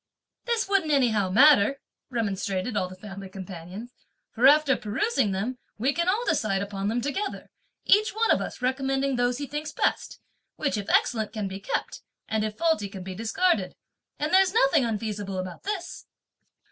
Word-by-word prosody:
"This 470 -3 0
wouldn't 390 -6 +1
anyhow 225 -9 +2
matter," 275 +3 +5 0.3
remonstrated 205 -2 -2
all 185 -2 0
the 185 - -10
family 195 0 -9
companions, 190 +4 -8 0.4
"for 245 +3 +4
after 295 -1 +5
perusing 220 - 0
them 220 +7 -3 0.2
we 260 +6 +1
can 340 +3 0
all 440 +6 +1
decide 200 -3 +1
upon 200 0 -4
them 230 +3 0
together, 390 - -4 0.3
each 425 +2 +5
one 450 +2 +1
of - - +3
us - - -6
recommending 270 +1 0
those 245 0 +1
he 285 - -4
thinks 295 +2 -5
best; - - -1 0.4
which 295 -3 -1
if 205 -1 -4
excellent 220 -3 +2
can 210 -3 -3
be 190 0 -6
kept, - - -3 0.3
and 220 -1 0
if 215 -1 -4
faulty 320 -12 +1
can 190 -2 -8
be 190 0 -6
discarded; 230 - 0 0.4
and 305 +4 -2
there's 380 +1 +5
nothing 275 - +4
unfeasible 210 -3 -3
about 185 -1 -5
this!" 395 -4 -5
240 Hz, 170 wpm, -26 LUFS, 200-300 Hz, 0.4 s, matter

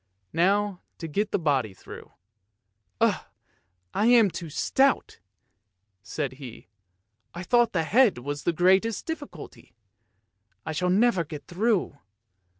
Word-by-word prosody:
Now 195 +2 +1 0.2
to 165 - -6
get 205 +7 -1
the - - 0
body 135 - 0
through. - - -12 0.5
" 100 0 -40
Ugh! - - +2 0.7
I 215 - +1
am 235 -5 +5
too 165 0 -7
stout," 270 - +1 0.8
said 140 +6 -4
he. 130 -6 -11 0.3
" 110 +3 -50
I 175 - -5
thought 240 +4 +3
the 165 -4 +1
head 225 - +3
was 145 +4 -5
the - - +1
greatest 190 +6 +2
difficulty. 290 - -8 0.9
I - - -3
shall 180 +4 -1
never 195 -1 +3
get 150 -2 -9
through." 190 -6 -1
175 Hz, 135 wpm, -26 LUFS, 145-210 Hz, 0.9 s, am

